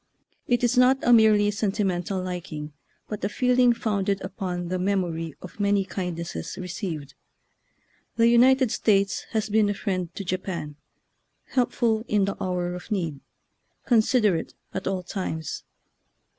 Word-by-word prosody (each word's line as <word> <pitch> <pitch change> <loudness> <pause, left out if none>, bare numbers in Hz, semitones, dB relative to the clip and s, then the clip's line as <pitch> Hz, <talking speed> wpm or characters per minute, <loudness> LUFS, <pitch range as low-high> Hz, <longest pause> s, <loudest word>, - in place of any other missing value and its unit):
It 245 -1 +1
is 245 +1 +3
not 255 +1 +6
a 240 - +5
merely 215 -2 +5
sentimental 195 -3 -1
liking, 170 -5 -5 0.3
but 210 - -6
a 200 - +1
feeling 250 +1 +3
founded 200 -4 0
upon 180 -2 -4
the 185 0 -1
memory 175 -5 -1
of 185 - -11
many 200 -1 +2
kindnesses 170 - -5
received. 170 -6 -5 1.0
The 230 0 +4
United 255 +1 +5
States 200 -4 +1
has 220 -1 0
been 215 -1 +3
a 205 - -1
friend 185 -4 -2
to 200 - -4
Japan, 180 -5 -4 0.7
helpful 235 -3 +1
in 205 -2 +2
the 200 - -2
hour 180 -1 -1
of 180 +3 -8
need, 170 -9 -2 0.7
considerate 220 -7 +2 0.2
at 190 - -4
all 190 -1 -1
times. 175 -5 -4
195 Hz, 135 wpm, -25 LUFS, 180-220 Hz, 1.0 s, not